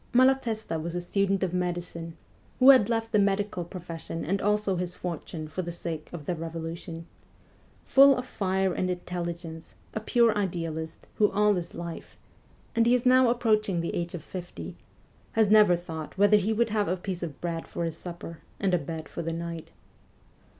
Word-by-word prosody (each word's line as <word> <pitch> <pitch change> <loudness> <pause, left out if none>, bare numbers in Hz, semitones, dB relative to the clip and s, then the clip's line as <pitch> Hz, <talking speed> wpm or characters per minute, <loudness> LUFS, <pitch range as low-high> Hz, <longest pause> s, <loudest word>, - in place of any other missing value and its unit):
Malatesta 240 -9 +2
was 170 +2 -4
a - - 0
student 195 +2 0
of 180 -2 -1
medicine, 175 -2 -3 0.4
who 265 +1 +9
had 250 -6 +5
left 225 -1 -1
the 210 - +4
medical 200 -2 +1
profession 170 -2 -6
and 195 +4 0
also 210 -1 +1
his 180 0 -3
fortune 165 -2 -5
for 170 +4 -4
the 175 -1 -5
sake 165 -2 -5
of 160 -4 -7
the 180 - -1
revolution; 165 0 -6 0.8
full 275 0 +7
of 250 - -3
fire 190 -4 0
and 185 - -1
intelligence, 170 -2 -5 0.2
a - - -2
pure 230 +1 +3
idealist, 165 -5 -3
who 210 - +4
all 210 0 +3
his 175 -3 -4
life 170 -1 -7 0.6
and 230 0 +4
he 245 - +5
is 250 - -1
now 255 -1 +6
approaching 215 -6 +2
the 170 - -2
age 175 +1 -3
of 170 - -7
fifty 180 -2 -7 0.6
has 220 -2 +3
never 210 -4 +7
thought 165 -1 -7
whether 205 +2 +6
he 205 +2 0
would 225 0 +1
have 210 -2 +1
a 185 - 0
piece 180 -1 -4
of 160 -5 -5
bread 165 -1 -3
for - - -4
his 165 -1 -3
supper 170 -2 -8 0.2
and 195 -2 +1
a 180 - +4
bed 160 0 -6
for - - -6
the 165 0 -3
night. 165 -1 -5
180 Hz, 185 wpm, -28 LUFS, 170-210 Hz, 0.8 s, who